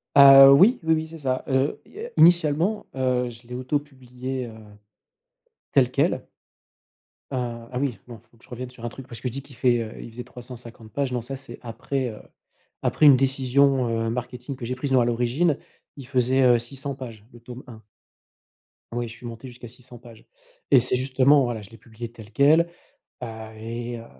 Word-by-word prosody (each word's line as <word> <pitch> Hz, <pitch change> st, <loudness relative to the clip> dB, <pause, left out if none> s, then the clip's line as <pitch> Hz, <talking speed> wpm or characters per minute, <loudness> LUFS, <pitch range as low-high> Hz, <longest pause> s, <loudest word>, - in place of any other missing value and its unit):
Ah 135 Hz, -1 st, +10 dB
oui, 195 Hz, -, +6 dB
oui, 160 Hz, 0 st, +3 dB
oui, 160 Hz, 0 st, -3 dB
c'est 165 Hz, 0 st, -11 dB
ça. 130 Hz, -2 st, -2 dB
Heu, 135 Hz, +1 st, 0 dB
il -, -, -21 dB
y 425 Hz, -, -11 dB
a -, -, -8 dB
initialement, 170 Hz, +4 st, +4 dB
heu, 125 Hz, -1 st, 0 dB
je 120 Hz, 0 st, -14 dB
l'ai 125 Hz, -, -7 dB
auto-publié, 130 Hz, -2 st, -4 dB
heu, -, -, -9 dB, 1.2 s
tel -, -, +4 dB
quel -, -, 0 dB, 1.1 s
ah 120 Hz, -2 st, -4 dB
ah 125 Hz, -, -3 dB
oui, 135 Hz, -5 st, -1 dB
non, 115 Hz, -2 st, -9 dB
il 115 Hz, -, -34 dB
faut 115 Hz, -, -25 dB
que -, -, -26 dB
je -, -, -20 dB
revienne 125 Hz, +1 st, -6 dB
sur 125 Hz, -2 st, -15 dB
un 120 Hz, -, -2 dB
truc 130 Hz, +2 st, -11 dB
parce 115 Hz, -1 st, -10 dB
que -, -, -3 dB
je -, -, -10 dB
dis 140 Hz, -, -5 dB
qu'il 135 Hz, -2 st, -17 dB
fait, 120 Hz, -1 st, +2 dB
heu 110 Hz, -, -6 dB
heu, -, -, -10 dB
il 115 Hz, -, -10 dB
faisait 125 Hz, +2 st, -8 dB
350 120 Hz, -2 st, -12 dB
pages, 140 Hz, 0 st, -2 dB
non 125 Hz, -, -1 dB
ça 135 Hz, +3 st, -6 dB
c'est 130 Hz, -3 st, -11 dB
après, 125 Hz, +2 st, -3 dB
heu, 105 Hz, -, -9 dB, 0.6 s
après 155 Hz, -, +2 dB
une 140 Hz, -, +9 dB
décision, 135 Hz, 0 st, +2 dB
heu, 115 Hz, 0 st, -1 dB
marketing 125 Hz, +2 st, -5 dB
que 120 Hz, -, -6 dB
j'ai 125 Hz, +2 st, -3 dB
prise. 135 Hz, +1 st, -4 dB
Non, 130 Hz, -, +5 dB
à 120 Hz, -, +2 dB
l'origine 125 Hz, +7 st, +1 dB, 0.4 s
il 135 Hz, -, -9 dB
faisait, 130 Hz, 0 st, +2 dB
heu, 120 Hz, -2 st, +5 dB
600 135 Hz, +3 st, -6 dB
pages, 115 Hz, -6 st, -10 dB
le 120 Hz, -, -15 dB
tome 125 Hz, +2 st, -10 dB
1. 110 Hz, -3 st, -12 dB, 1.1 s
Oui, 120 Hz, 0 st, -2 dB
je 115 Hz, -, -10 dB
suis -, -, -13 dB
monté 115 Hz, +2 st, -8 dB
jusqu'à 120 Hz, -1 st, -11 dB
600 125 Hz, -1 st, -14 dB
pages 120 Hz, -2 st, -15 dB, 0.4 s
et 130 Hz, -, +6 dB
c'est 125 Hz, +1 st, +1 dB
justement 135 Hz, +1 st, +3 dB
voilà, 115 Hz, -3 st, -3 dB
je 100 Hz, -, -12 dB
l'ai 115 Hz, -, -14 dB
publié 115 Hz, +1 st, -9 dB
tel 110 Hz, -3 st, -13 dB
quel, 155 Hz, +7 st, +4 dB, 0.5 s
ah, 110 Hz, -2 st, -8 dB
et 115 Hz, +2 st, -5 dB
heu, 115 Hz, -, -10 dB
125 Hz, 210 wpm, -24 LUFS, 120-135 Hz, 1.2 s, Ah